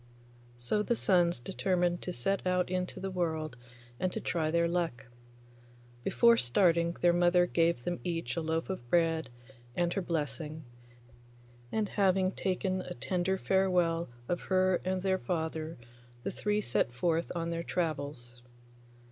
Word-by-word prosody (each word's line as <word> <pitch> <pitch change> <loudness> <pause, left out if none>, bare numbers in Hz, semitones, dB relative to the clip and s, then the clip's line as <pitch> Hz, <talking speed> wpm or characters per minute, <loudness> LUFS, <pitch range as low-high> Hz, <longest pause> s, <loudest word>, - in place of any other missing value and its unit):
So 120 - 0
the 235 +3 +1
sons 175 - +3
determined 180 +3 0
to 180 - -3
set 185 +8 0
out 180 0 +1
into 185 0 -2
the 195 0 -4
world 160 -5 -2 0.4
and 185 - 0
to - - -3
try 160 -2 -1
their 170 +1 +2
luck. 170 -7 -1 1.0
Before 235 - +5
starting 170 - +3
their 175 -1 +5
mother 175 0 +4
gave 165 -7 +1
them 175 +4 -2
each 165 -8 -2
a 170 - -1
loaf 160 +3 -1
of 120 -11 -7
bread 165 -3 +2 0.5
and 175 0 +1
her 195 - -1
blessing, 155 -2 -3 1.1
and 215 -1 0
having 190 -2 +2
taken 185 0 -1
a - - -7
tender 180 +8 0
farewell 180 -4 +2 0.2
of 175 - -1
her 185 -1 +2
and 185 0 -1
their 190 -1 +1
father 160 -2 -3 0.5
the - - -2
three 210 0 0
set 120 - +1
forth 165 +6 0
on 170 0 -2
their 170 0 -2
travels. 145 -8 -3
175 Hz, 145 wpm, -31 LUFS, 160-185 Hz, 1.1 s, Before